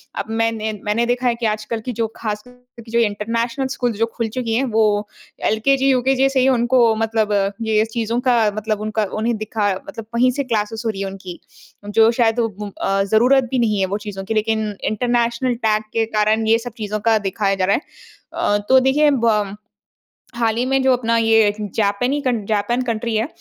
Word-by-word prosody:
अब - - -4
मैं 225 0 +1
ने 220 -1 -3
मैंने 215 +3 +1
देखा 245 +1 0
है 235 - +2
कि 235 -1 -4
आजकल 215 +1 -5
की 250 - -2
जो 225 - +1
खासकर 250 +3 -7
की 225 - -13
जो 235 - +2
इंटरनेशनल 230 +4 -1
स्कूल्स 245 -5 -2
जो 230 - +2
खुल 230 -1 -1
चुकी 230 -1 -3
हैं 265 - +1
वो 210 -1 +2 0.4
एलकेजी, 270 +5 +2
यूकेजी 265 +1 +2
से 270 -1 0
ही 255 - +3
उनको 240 -2 +3
मतलब 220 -1 0 0.3
ये 220 -1 +2
स - - -11
चीज़ों 230 +1 0
का 230 -4 +3
मतलब 215 0 -2
उनका 215 0 -1
उन्हें 230 +1 0
दिखा 215 -1 -1 0.2
मतलब 225 -7 -8
वहीं 250 +2 +4
से 280 +2 -2
क्लासेज़ 225 -2 -2
हो - - +1
रही 195 -2 -4
है 195 - -2
उनकी। 190 -2 -9 0.5
जो 225 +1 +5
शायद 235 -1 +1
उ 230 - +2
उ 205 0 -7
अ, 195 0 +1
ज़रूरत 245 +7 +4
भी 255 - +1
नहीं 215 -4 +1
है 190 - +2
वो 200 +2 -2
चीज़ों 205 -2 -7
की 225 - -2
लेकिन 220 -1 0
इंटरनेशनल 240 +2 0
टैग 215 0 +2
के 225 -1 +1
कारण 220 +1 +2
ये 225 +1 +5
सब 240 -1 -8
चीज़ों 215 -1 -3
का 225 - +5
दिखाया 195 0 -1
जा 185 -1 0
रहा 200 - +3
है। - - -2 0.5
अ, 205 - +1
तो 260 0 +7
देखिए 285 +3 +3 0.2
बम 210 -3 +1 0.8
हाल 225 -2 +1
ही 245 - +1
में 270 0 +1
जो 260 -1 +4
अपना 230 -2 0
ये 225 -2 +4 0.2
जापनी 225 +7 +1
कन 240 -6 -1
जापान 220 +4 0
कंट्री 230 -1 -2
है। 225 +5 0
225 Hz, 210 wpm, -20 LUFS, 215-245 Hz, 0.8 s, तो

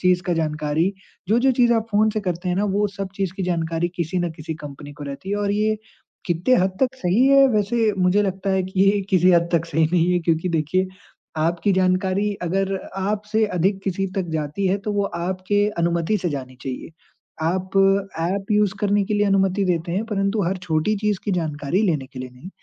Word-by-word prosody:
चीज़ 180 -1 +3
का 175 0 -1
जानकारी 155 +3 0 0.4
जो-जो 240 +5 +4
चीज़ 240 -1 +4
आप 225 -1 0
फ़ोन 215 +1 +3
से 215 0 -2
करते 180 -1 -3
हैं 180 - 0
ना 205 - +1
वो 210 +1 +2
सब 195 -1 -5
चीज़ 195 -3 -1
की 195 - -3
जानकारी 165 -1 -1
किसी 170 +2 -1
न 175 -1 -1
किसी 160 0 -6
कंपनी 145 0 -9
को 145 0 -9
रहती 140 +7 -7
है। 205 - 0
और 205 -1 0
ये 215 +1 +1 0.5
कितने 175 +8 +2
हद 190 0 -1
तक 265 0 +2
सही 205 +4 +2
है 275 0 +7
वैसे 220 0 +1
मुझे 185 +3 +3
लगता 195 0 -2
है 190 0 +2
कि 190 +1 -3
ये 200 +1 +4
किसी 185 0 +5
हद 170 0 +3
तक 165 -1 +2
सही 160 0 +2
नहीं 175 0 +3
है। 180 - +3
क्योंकि 165 +1 0
देखिए, 170 +3 0 0.5
आपकी 170 +5 +1
जानकारी 185 +2 +1
अगर 195 +3 0 0.2
आपसे 210 +3 0
अधिक 190 +3 +1
किसी 195 0 -1
तक 185 -3 -1
जाती 155 +5 -2
है, 190 +2 +1
तो 210 +1 -4
वो 205 -1 +1
आपके 190 +3 -1
अनुमति 170 +4 +1
से 180 - -1
जानी 130 -2 -6
चाहिए। 130 +3 -6 0.5
आप 185 +3 -1 0.5
ऐप 195 +4 -2
यूज़ 210 -1 +2
करने 205 0 +2
के 210 - -2
लिए 205 0 +2
अनुमति 195 0 +2
देते 170 -2 -1
हैं, 200 +5 -1
परंतु 200 -1 0
हर 185 +3 0
छोटी 165 +4 +1
चीज़ 205 -1 0
की 205 - -1
जानकारी 160 +1 -1
लेने 155 -10 0
के 130 - -11
लिए 125 0 -6
नहीं। 125 +8 -12
185 Hz, 210 wpm, -22 LUFS, 170-205 Hz, 0.5 s, है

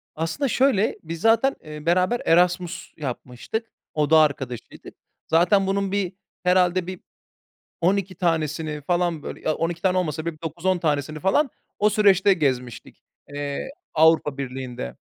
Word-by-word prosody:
Aslında 165 - -1
şöyle, 255 -5 +2
biz 165 0 -6
zaten, 230 +4 +3
eee, 150 0 -9
beraber 185 +7 +2
Erasmus 180 +1 +1
yapmıştık, 135 - -5 0.3
oda 155 +1 +3
arkadaşıydık. 135 -5 -2 0.3
Zaten 180 +4 +3
bunun 195 0 0
bir, 200 -2 -1 0.3
herhâlde 180 0 +2
bir 185 -1 -6 0.8
12 190 +1 +1
tanesini 155 -3 -1
falan 175 -1 0
böyle - - -7
ya 155 - 0
12 165 +1 -2
tane 185 -1 +2
olmasa 160 -2 -2
bile 170 - -2
bir 155 - -26
9-10 175 +3 -1
tanesini 155 -2 -1
falan 255 - +2 0.3
o 210 +1 +4
süreçte 200 -1 +4
gezmiştik, 130 -7 -3 0.3
eee, 145 - -4 0.2
Avrupa 155 -3 +4
Birliği'nde. 125 - -5
170 Hz, 135 wpm, -23 LUFS, 150-190 Hz, 0.8 s, o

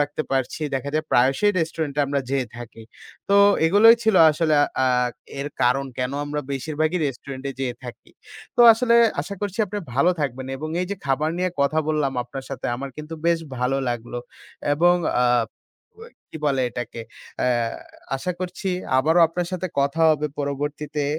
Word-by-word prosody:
রাখতে 145 +1 -1
পারছি। 135 +3 -1
দেখা 135 +1 -2
যায়, 155 0 0
প্রায়শই 135 +12 +3
রেস্টুরেন্টে 160 -3 -2
আমরা 140 0 0
যেয়ে 135 -3 0
থাকি। 115 -1 -10 0.5
তো 200 - +4 0.3
এগুলোই 220 +6 +7
ছিল 220 -2 +2 0.2
আসলে 155 0 +1 0.3
আ - - +2 0.5
এর 145 - -3
কারণ, 135 +3 +2
কেন 125 +1 -1
আমরা 150 0 -3
বেশিরভাগই 155 +5 -1
রেস্টুরেন্ট-এ 135 +1 -6
যেয়ে 125 -2 -2
থাকি। 120 - -10 0.5
তো - - +3
আসলে, 235 +1 +2 0.3
আশা 200 - -6
করছি 205 +1 -4
আপনি 205 +2 -4 0.2
ভালো 140 +7 +4
থাকবেন। 130 -2 -3
এবং 155 +3 -5
এই 180 - -1
যে 200 - -2
খাবার 150 +4 +1
নিয়ে 185 0 0
কথা 145 +3 +2
বললাম 150 -3 0
আপনার 135 +2 -8
সাথে, 135 - -4
আমার 135 +2 -6
কিন্তু 150 +2 -7
বেশ 170 -1 +3 0.2
ভালো 125 +2 0
লাগলো। 120 0 -4 0.6
এবং 175 +3 +4 0.3
আ - - +3 1.1
কি - - -8
বলে 135 -2 +1
এটাকে, 120 -1 -6 0.4
আ - - +2 0.7
আশা 180 +7 -3
করছি, 185 +2 -4 0.3
আবারো 160 +5 +3
আপনার 170 +2 -3
সাথে 185 0 -2
কথা 140 +4 0
হবে 150 0 +1
পরবর্তীতে। 145 +1 -3
145 Hz, 160 wpm, -23 LUFS, 135-170 Hz, 1.1 s, এগুলোই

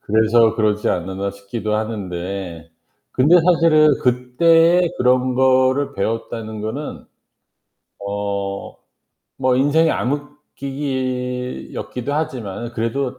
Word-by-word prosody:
'그래서 110 +1 +3
그러지 105 -1 0
않았나?' 95 +2 -3
싶기도 100 +2 -4
하는데 95 -5 -5 0.4
근데 150 +7 +5
사실은 160 -4 +4
그때에 165 +8 +3
그런 125 0 +2
거를 130 +1 +2
배웠다는 110 +1 -4
거는 120 +8 -5 1.0
어 100 -1 -4 0.6
뭐 130 -1 +2
인생의 150 +5 +3
암흑기기 130 -3 -4
였기도 125 +3 -4
하지만 120 -6 -4
그래도 125 +3 -2
125 Hz, 230 characters per minute, -20 LUFS, 105-140 Hz, 1.0 s, 근데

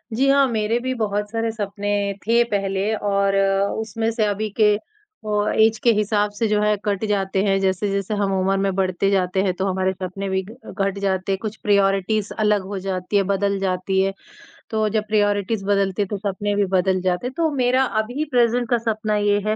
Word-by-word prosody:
जी 270 +3 +2
हाँ, 275 0 +5
मेरे 225 0 0
भी 260 +1 -2
बहुत 210 -1 -1
सारे 225 0 -1
सपने 205 -1 -4 0.4
थे 235 +2 +4
पहले 195 +1 0
और 200 -1 +1 0.4
उसमें 225 +1 -2
से 225 -1 0
अभी 210 +1 -1
के 210 -1 +5 0.5
ओ, 210 0 0
ऐज 220 0 +3
के 235 - +5
हिसाब 210 0 +1
से 215 +2 -1
जो 210 0 +1
है 210 0 +2
कट 205 -1 -1
जाते 195 -2 0
हैं, 195 -1 +2
जैसे-जैसे 195 +1 -1
हम 195 -1 0
उम्र 190 +1 +1
में 195 0 0
बढ़ते 190 0 0
जाते 190 -1 +1
हैं 190 -2 +1
तो 190 +2 -3
हमारे 190 0 0
सपने 190 +1 -5
भी 190 0 0
ग 245 +4 -12
घट 195 0 0
जाते 190 -1 -1
हैं, 195 - +1
कुछ 215 -1 -4
प्रायोरिटीज़ 200 0 +1
अलग 210 -1 +2
हो 200 -1 -4
जाती 185 +1 -3
है, 200 - +3
बदल 200 +1 0
जाती 190 0 0
है। 195 0 0 0.6
तो 220 -1 0
जब 215 0 0
प्रायोरिटीज़ 205 -1 0
बदलती 200 -1 +1
है - - +2
तो 205 - -3
सपने 205 +1 -2
भी 205 0 +2
बदल 185 0 +2
जाते 180 +4 -1
हैं, 255 - -6
तो 330 -1 +2
मेरा 255 0 +2 0.2
अभी 245 +8 -4
प्रेज़ेंट 240 -1 +2
का 240 - +3
सपना 220 -2 -1
ये 205 0 +2
है 215 - +1
205 Hz, 205 wpm, -22 LUFS, 195-220 Hz, 0.6 s, हाँ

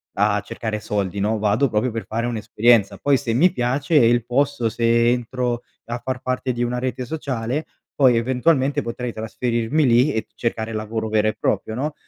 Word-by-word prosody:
a 105 +1 +2
cercare 105 +1 -4
soldi, 100 -2 -2
no. 110 +2 +1
Vado 105 +6 +2
proprio 110 +3 0
per 115 0 -5
fare 115 +2 -2
un'esperienza. 110 -2 +2
Poi 140 -1 +2
se 115 -2 -2
mi 175 +9 +4
piace 135 +6 -1
il 120 -3 +4
posto, 125 -1 +1
se 115 +1 +2
entro 120 0 -2 0.2
a 120 +1 -4
far 130 -1 -3
parte 130 0 -2
di 120 0 -1
una 120 +1 -1
rete 130 0 -3
sociale 130 0 -3 0.3
poi 130 -4 +5
eventualmente 135 +3 +1
potrei 120 0 -4
trasferirmi 120 +5 -1
lì 125 +4 +4
e 110 - -2
cercare 115 -1 -3
lavoro 110 +1 -3
vero 110 0 +2
e 110 - 0
proprio, 110 - -1
no. 145 +5 -2
120 Hz, 180 wpm, -22 LUFS, 110-130 Hz, 0.3 s, poi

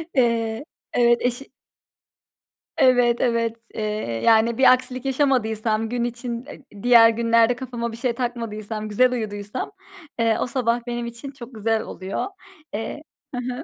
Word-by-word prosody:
Eee 230 0 +1 0.3
Evet, 240 -1 +4
eşi 245 +2 -2 1.3
Evet, 245 -2 +4
evet, 230 -2 +1 0.2
eee, - - -4 0.4
yani, 225 0 +4
bir 265 - +7
aksilik 255 0 -3
yaşamadıysam 225 -5 +1
gün 240 0 -1
için 240 +1 -4
e 230 -8 -13
diğer 235 -2 +8
günlerde 230 +1 +3
kafama 240 -2 -4
bir 225 - -8
şey 245 0 0
takmadıysam 220 -3 -4
güzel 250 +4 +3
uyuduysam, 210 - -4 0.5
eee, 230 -1 +3
o - - 0
sabah 240 -1 0
benim 240 0 -3
için 235 +4 -7
çok 250 -2 -11
güzel 220 +1 0
oluyor. 190 -2 -4 0.5
Eee 225 +8 -4 0.3
Hı - - -3 0.2
hı. 260 +5 -6
235 Hz, 140 wpm, -23 LUFS, 225-250 Hz, 1.3 s, diğer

